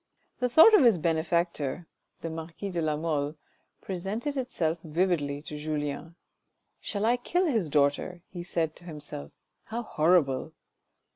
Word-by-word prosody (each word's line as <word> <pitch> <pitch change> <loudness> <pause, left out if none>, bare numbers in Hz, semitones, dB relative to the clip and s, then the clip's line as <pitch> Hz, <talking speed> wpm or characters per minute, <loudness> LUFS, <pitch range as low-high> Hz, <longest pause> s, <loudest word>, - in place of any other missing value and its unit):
The 250 -1 +1
thought 325 - +8
of 415 - +7
his 230 -6 +6
benefactor 165 -1 0 0.2
— - - -45
the 165 - -4
marquis 165 +5 -6
de 175 -2 -1
la 155 -1 0
Mole 150 -2 -1 0.2
— - - -45
presented 200 +9 -3
itself 175 - -1
vividly 155 -4 0
to 150 - -7
Julien. 150 +2 -3 0.3
" - - -50
Shall 205 0 -2
I 240 +2 +3
kill 355 +9 0
his 225 - +1
daughter? 145 +5 +1
" - - -48
he 175 - -5
said 165 -3 -1
to 175 - -14
himself, 145 - -6 0.2
" - - -49
how 235 +2 -4
horrible." 155 - +2
170 Hz, 165 wpm, -28 LUFS, 150-200 Hz, 0.3 s, thought